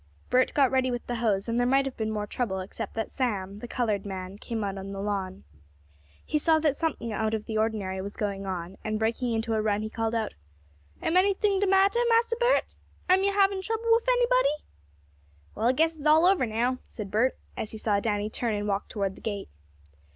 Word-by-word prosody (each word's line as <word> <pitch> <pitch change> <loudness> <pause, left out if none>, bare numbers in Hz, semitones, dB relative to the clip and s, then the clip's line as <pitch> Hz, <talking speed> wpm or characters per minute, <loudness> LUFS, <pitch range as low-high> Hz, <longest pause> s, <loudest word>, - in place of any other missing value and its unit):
Bert 255 +1 +4
got 275 -3 +4
ready 260 -1 +2
with 245 -1 -3
the 240 - -3
hose, 210 -4 0
and 230 +1 0
there 245 - +2
might 270 +2 +3
have 270 - -4
been 220 -1 -2
more 210 -1 -2
trouble, 205 -3 -2
except 200 +3 -6
that 225 -1 -3
Sam, 205 -6 -2
the 240 - -7
colored 215 -5 -1
man, 190 0 -6
came 225 -2 -3
out 195 -1 -3
on 195 +1 -6
the 195 - -5
lawn. 195 -2 -3 0.8
He 300 - 0
saw 320 +1 +4
that 305 -3 +2
something 285 -9 -2
out 220 +1 0
of 215 - -5
the 220 -1 -2
ordinary 205 -4 -1
was 200 +2 -6
going 200 -2 -3
on, 180 0 -5
and 215 0 -1
breaking 230 +3 0
into 225 0 -1
a 220 - +1
run 210 0 0
he 215 - -5
called 225 0 -1
out: 220 -2 -1 0.7
"Am 340 - +2
anything 395 +1 +3
de 405 - +2
mattah, 390 +5 +4
Massa 465 0 +3
Bert? - - +4 0.5
Am 375 +1 +5
yo' 400 - +3
habin' 395 -1 +3
trouble 450 +3 -1
wif 460 +2 +4
anybody?" - - +2 0.9
"Well, 225 - 0
I - - +6
guess 320 +5 +2
it's 305 -1 -3
all 315 +3 +6
over 365 -9 +4
now," 240 +4 0
said 205 -4 -7
Bert, 235 +5 +2 0.2
as 215 - -4
he 220 - -7
saw 210 -2 +1
Danny 205 -1 -1
turn 220 0 -1
and 205 0 -2
walk 200 0 -1
toward 195 -3 -2
the - - -15
gate. 205 -3 -4
225 Hz, 220 wpm, -27 LUFS, 205-305 Hz, 0.9 s, I